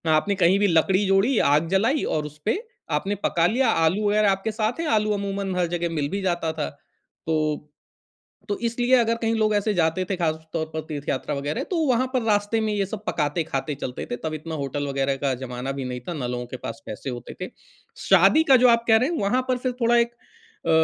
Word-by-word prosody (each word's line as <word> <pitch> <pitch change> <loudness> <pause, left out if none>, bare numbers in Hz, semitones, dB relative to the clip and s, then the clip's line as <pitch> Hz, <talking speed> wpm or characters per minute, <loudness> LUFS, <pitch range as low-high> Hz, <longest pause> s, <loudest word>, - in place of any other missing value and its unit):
आपने 160 +6 +2
कहीं 185 0 +4
भी 205 - +3
लकड़ी 185 +3 +3
जोड़ी, 195 +6 +3
आग 150 +3 +3
जलाई 225 - +2
और 155 -1 -1
उसपे 150 - -3 0.3
आपने 200 +1 0
पका 165 -1 +2
लिया, 250 +7 +2
आलू 180 +6 +2
वग़ैरह 210 -1 +3
आपके 195 +3 -1
साथ 220 +5 -2
हैं, 330 - -1
आलू 215 -4 +2
अमूमन 200 -1 -3
हर 180 -1 +1
जगह 170 0 -2
मिल 145 -2 -1
भी 200 +4 -3
जाता 175 -3 0
था। 155 -2 -3 0.6
तो 155 -2 0 0.8
तो 205 - -1
इसलिए 245 +2 +2
अगर 230 -2 +3
कहीं 225 -1 0
लोग 215 -1 +2
ऐसे 205 +1 +1
जाते 170 0 +1
थे 195 - 0
ख़ास 165 -3 +1 0.2
तौर 160 -2 -1
पर 160 - -2
तीर्थयात्रा 145 -2 -3
वग़ैरह, 145 +2 -2
तो 360 - -3
वहाँ 255 0 +2
पर 255 - +2
रास्ते 210 0 +1
में 215 -1 0
ये 200 -1 0
सब 210 +2 -7
पकाते-खाते 150 -3 -1
चलते 125 -2 -5
थे, - - 0
तब 155 +4 -4
इतना 160 +1 -5
होटल 145 0 -3
वग़ैरह 135 0 0
का 135 -2 +2
जमाना 125 +1 -5
भी 135 - -3
नहीं 125 0 -4
था - - -2
ना 135 -6 -3
लोगों 125 0 -3
के 130 - -5
पास 115 - -6
पैसे 110 +5 -6
होते 120 -1 -7
थे। 185 - -4 0.6
शादी 320 - +6
का - - +10
जो - - +8
आप 230 0 +4
कह 220 - +6
रहे 255 +6 +1
हैं, 345 - -2
वहाँ 205 +6 +2
पर 255 -1 +1
फिर 255 - +2
थोड़ा 235 +1 +4
एक 235 0 +2 0.5
अ, - - +1
185 Hz, 225 wpm, -24 LUFS, 150-220 Hz, 0.8 s, का